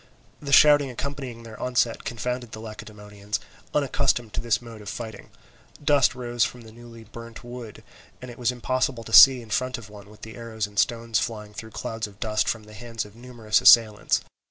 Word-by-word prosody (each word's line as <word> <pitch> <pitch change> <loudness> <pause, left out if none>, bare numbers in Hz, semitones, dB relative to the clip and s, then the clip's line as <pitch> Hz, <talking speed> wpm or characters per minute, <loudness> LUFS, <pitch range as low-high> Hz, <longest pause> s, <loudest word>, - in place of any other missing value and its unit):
The 140 -1 -5
shouting 145 -1 +6
accompanying 130 -2 -6
their 110 -2 -11
onset 120 -2 0
confounded 125 0 -4
the 110 - -7
Lacedaemonians, 105 -2 -7 0.3
unaccustomed 120 -5 0
to - - -2
this 120 -2 +1
mode 115 -3 -11
of 105 - -8
fighting; 110 -2 -8 0.5
dust 145 -4 +3
rose 120 -2 -1
from 125 +2 -3
the 110 -1 -13
newly 115 0 -13
burnt 115 +1 -11
wood, 120 -3 -9 0.4
and 125 -1 -9
it 120 - -13
was 120 0 +1
impossible 125 0 -1
to 110 - -10
see 130 -1 +9
in 110 - -14
front 130 +3 -1
of 105 -3 -12
one 100 -1 -13
with 105 0 -17
the 110 +1 -9
arrows 115 -2 -4
and 105 0 -4
stones 115 -1 +1
flying 105 -2 -5
through 110 +2 -8
clouds 115 -1 -5
of 100 -1 -17
dust 110 -1 0
from 115 -2 -2
the 105 0 -15
hands 115 +1 -6
of 105 0 -15
numerous 115 -3 -1
assailants. 110 -3 +5
115 Hz, 195 wpm, -25 LUFS, 110-125 Hz, 0.5 s, see